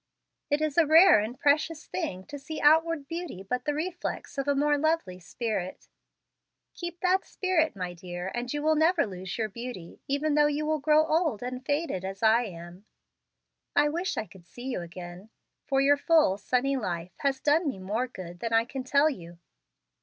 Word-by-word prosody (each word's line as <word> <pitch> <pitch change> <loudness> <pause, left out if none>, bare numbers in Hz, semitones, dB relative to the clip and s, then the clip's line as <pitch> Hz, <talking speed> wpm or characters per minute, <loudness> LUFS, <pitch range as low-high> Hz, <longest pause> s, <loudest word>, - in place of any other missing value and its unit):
It 290 +1 +1
is 310 +1 +1
a 330 - +5
rare 325 - +8
and 220 +5 -4
precious 305 +2 +1
thing 185 0 -4
to 285 - -8
see 300 +3 -6
outward 320 -1 +3
beauty 330 - -6
but 250 +6 -3
the 295 - 0
reflex 345 -1 -4
of 275 - -2
a 285 - +2
more 295 +1 +3
lovely 295 - 0
spirit. 190 0 -4 0.8
Keep 345 -1 -7
that 375 +1 +2
spirit, 355 - 0
my 180 -2 -4
dear, 175 +1 -6
and 240 0 -3
you 295 0 -3
will 315 +1 +4
never 325 +3 +3
lose 185 -2 -6
your 220 -2 0
beauty 230 -5 -8
even 285 +2 0
though 295 0 +5
you 305 +1 -1
grow 305 +1 +4
old 315 - 0
and 250 +1 -5
faded 285 - -1
as 195 +2 -6
I 225 +2 +4
am. 175 +1 -10 0.9
I 295 +1 +4
wish 350 +6 -2
I - - -1
could 185 -5 -17
see 250 +7 -7
you 245 - -3
again, 175 +3 -9 0.4
for 270 -1 +2
your 285 +1 +4
full, 300 - +3
sunny 255 +5 0
life 180 -7 -4
has 275 -1 0
done 305 +4 +2
me 270 - -2
more 210 +7 -2
good 175 -7 -9
than 230 +2 -3
I 225 0 +4
can 265 +1 -6
tell 280 +3 +3
you." 175 - -5
270 Hz, 190 wpm, -28 LUFS, 195-310 Hz, 0.9 s, rare